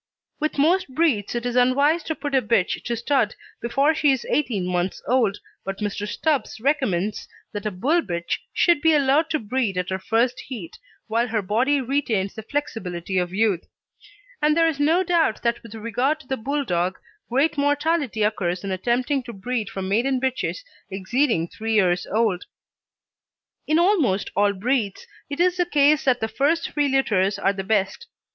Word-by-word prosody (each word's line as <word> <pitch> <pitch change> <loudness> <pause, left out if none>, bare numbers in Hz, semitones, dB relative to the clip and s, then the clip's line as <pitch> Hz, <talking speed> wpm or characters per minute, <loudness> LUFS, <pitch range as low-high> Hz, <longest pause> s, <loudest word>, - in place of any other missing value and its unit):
With 310 0 -2
most 350 +6 +3
breeds 260 -11 +1
it 240 0 -2
is 245 0 -2
unwise 280 +6 +3
to 320 - -2
put 290 -2 -5
a 265 - +4
bitch 210 -5 +1
to 240 - -1
stud 235 -2 0 0.3
before 275 +6 +2
she 300 -3 +3
is 265 -2 -1
eighteen 230 -11 0
months 180 0 -1
old, 230 -5 +2 0.3
but 195 0 -4
Mr. 205 0 -3
Stubbs 290 -1 -1
recommends 215 - 0 0.2
that 205 0 -4
a - - +1
Bull 280 - +1
bitch 170 - -3
should 340 -4 +3
be 320 -1 +4
allowed 290 +3 +3
to 310 - +1
breed 225 -4 -2
at 180 +1 -2
her 190 - -1
first 230 +5 +1
heat, 225 -11 -8 0.3
while 230 +2 0
her 220 -2 -1
body 250 +9 +2
retains 235 -7 -1
the 220 - -7
flexibility 195 -9 -3
of 180 -1 -2
youth; 200 -3 0 0.7
and 300 +1 +3
there 330 0 +5
is 310 -3 -2
no 325 +6 +3
doubt 335 -10 +1
that 235 0 0
with 230 -1 -11
regard 245 +7 -1
to 270 - -20
the 265 - -1
Bulldog 220 -9 -1 0.3
great 275 +7 +2
mortality 290 -4 +1
occurs 185 -4 -1
in 195 - -3
attempting 245 +8 0
to 240 - -9
breed 220 +1 -3
from 190 -1 -5
maiden 250 +7 +1
bitches 265 - -2 0.3
exceeding 195 - 0
three 220 +4 -3
years 180 -3 +2
old. 210 -4 0 1.2
In 310 - +3
almost 330 - +2
all 205 +1 +3
breeds 210 0 -1 0.2
it 285 - -5
is 360 +1 +3
the 355 - +2
case 300 -1 +3
that 255 -2 +2
the 220 - 0
first 285 +9 0
three 290 -1 +1
litters 205 -8 +2
are 195 - +1
the 195 -1 -4
best. 200 - -1
240 Hz, 180 wpm, -23 LUFS, 200-290 Hz, 1.2 s, there